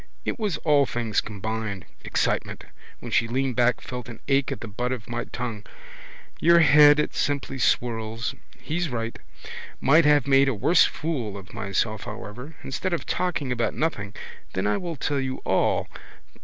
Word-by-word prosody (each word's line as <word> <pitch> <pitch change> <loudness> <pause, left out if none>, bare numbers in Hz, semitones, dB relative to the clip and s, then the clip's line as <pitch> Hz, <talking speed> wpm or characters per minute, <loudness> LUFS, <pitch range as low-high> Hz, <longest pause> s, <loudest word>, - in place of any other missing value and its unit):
It - - -2
was 210 -5 -1
all 145 -3 +4
things 115 -3 0
combined. 105 -2 -4 0.2
Excitement. - - -1 0.4
When - - -7
she 115 - +3
leaned 130 +1 -1
back, 125 -1 +2
felt 125 -2 -7
an 115 - -9
ache 135 -1 +2
at - - -5
the 115 - -5
butt 120 +4 -3
of 125 -4 -4
my 120 0 -3
tongue. 115 -4 -5 0.8
Your 170 +1 +6
head 150 -1 +7
it 150 - 0
simply 140 -2 -1
swirls. 115 0 0 0.3
He's 170 +1 -2
right. 115 -2 -4 0.6
Might 155 +4 +5
have 145 -3 +5
made 135 0 +5
a 130 - -1
worse 135 - +5
fool 125 -11 -3
of 95 0 -12
myself 110 +2 -2
however. 125 +9 -8
Instead 135 +7 -3
of 170 - -2
talking 175 -7 -1
about 120 -1 0
nothing. 105 -11 -2 0.4
Then 95 +1 -1
I 105 0 +2
will 170 -2 -4
tell 145 0 -1
you 130 -1 -2
all. - - +1
125 Hz, 170 wpm, -25 LUFS, 110-145 Hz, 0.8 s, head